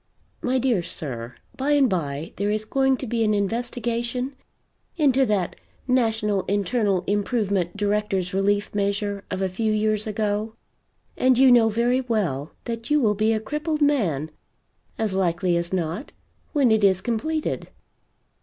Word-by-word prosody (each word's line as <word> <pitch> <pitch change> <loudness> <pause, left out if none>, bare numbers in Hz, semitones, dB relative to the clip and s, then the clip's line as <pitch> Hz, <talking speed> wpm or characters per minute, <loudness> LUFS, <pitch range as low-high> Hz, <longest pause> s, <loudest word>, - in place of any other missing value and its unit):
My 255 +1 +1
dear 245 -7 +2
sir, 125 -8 -4 0.2
by 280 +3 +1
and 280 -2 +5
by 160 - -3
there 200 +1 0
is 215 +1 -1
going 265 +2 +2
to 265 - -5
be 230 -1 0
an 215 -1 +2
investigation 235 +4 -2 0.6
into 270 -4 +3
that 195 -5 0 0.3
National 220 -5 +1
Internal 200 -1 +1
Improvement 200 -3 0
Directors' 205 -3 0
Relief 205 +1 +1
Measure 200 0 -1
of 190 0 -2
a - - +2
few 215 +4 -1
years 215 0 +1
ago, 215 +1 -2 0.6
and 255 -1 +4
you 260 0 +7
know 235 -2 +6
very 240 +4 +1
well 185 - -1
that 230 -1 -5
you 300 0 +4
will 215 -6 +3
be 215 +2 +1
a 220 - +1
crippled 300 +5 -2
man, 175 - +1 0.7
as 220 -3 -1
likely 180 -1 +1
as 170 0 -2
not, 180 - -3 0.4
when 275 -6 +3
it 220 -1 +3
is 190 -2 +4
completed." 280 +9 -2
215 Hz, 150 wpm, -24 LUFS, 195-245 Hz, 0.7 s, you